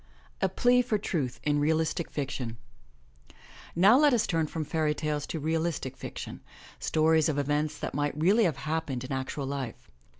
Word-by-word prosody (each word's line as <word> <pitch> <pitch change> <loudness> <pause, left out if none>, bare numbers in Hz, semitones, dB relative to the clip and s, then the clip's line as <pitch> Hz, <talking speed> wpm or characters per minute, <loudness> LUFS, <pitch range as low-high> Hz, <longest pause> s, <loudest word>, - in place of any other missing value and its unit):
A 190 - +3
PLEA 245 +6 +4
FOR 235 -3 0
TRUTH 150 - -2
IN 145 -1 +2
REALISTIC 160 +2 +1
FICTION 130 -5 -4 1.2
OW 205 +9 +7
let 295 -4 +5
us 225 - +2
turn 165 -3 0
from 155 0 -4
fairy 150 0 0
tales 150 -1 -2
to 160 - -3
realistic 160 -3 -1
fiction, - - -7 0.4
stories 160 0 +3
of 145 - -1
events 150 +1 0
that - - -4
might 145 +1 -1
really 200 +7 +4
have 165 - 0
happened 150 -5 -2
in 130 - -7
actual 135 +1 -3
life. 135 -4 -5
155 Hz, 165 wpm, -29 LUFS, 145-170 Hz, 1.2 s, OW